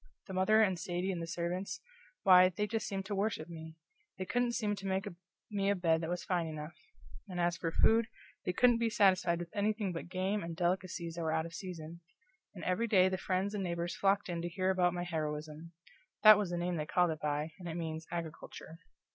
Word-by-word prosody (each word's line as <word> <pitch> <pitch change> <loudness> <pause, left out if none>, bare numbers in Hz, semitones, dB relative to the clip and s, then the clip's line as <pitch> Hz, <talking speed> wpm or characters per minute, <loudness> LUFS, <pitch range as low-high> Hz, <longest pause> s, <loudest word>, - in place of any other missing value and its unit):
The 190 - -8
mother 215 +4 +4
and 190 -4 +1
Sadie 180 +2 -2
and 175 -2 -3
the 165 - -4
servants 175 +3 -3 0.4
why, 185 -1 +8
they 195 +3 -2
just 220 +1 -2
seemed 195 -1 -3
to 205 - -4
worship 200 -5 -1
me. 160 -1 -9 0.4
They 185 - -3
couldn't 245 +3 0
seem 210 -3 0
to 195 0 -6
make 190 +1 -1 0.4
me 200 -1 0
a 200 - +3
bed 165 -3 +2
that 160 - -3
was 180 0 -2
fine 175 -3 0
enough; 155 +1 -6 0.6
and 180 -1 -4
as 175 0 +2
for 165 -1 -3
food, 225 +6 +4 0.4
they - - 0
couldn't 240 +5 +4
be 230 -1 +2
satisfied 185 -5 +3
with 175 +3 -7
anything 210 -2 0
but 165 - -6
game 190 +3 -1
and 170 0 -5
delicacies 175 -1 -1
that - - -2
were 160 -1 0
out 160 0 0
of 170 - -9
season; 170 -3 -7 0.6
and 180 - -8
every 185 +6 0
day 190 -4 +5
the 185 - -1
friends 190 +2 -1
and 205 -2 -2
neighbors 170 -1 -2
flocked 200 +1 +2
in 170 -2 -3
to 175 - -3
hear 185 +2 0
about 180 -2 +2
my 175 - -2
heroism 155 -1 -4 0.5
that 215 -1 +11
was 205 -3 -1
the 175 - -2
name 175 0 -1
they 150 -1 -3
called 180 0 +3
it 155 - -5
by, 150 +1 -1
and 175 -2 -6
it 165 - -4
means 160 -1 -4
agriculture. 165 -1 -7
180 Hz, 220 wpm, -33 LUFS, 170-195 Hz, 0.6 s, that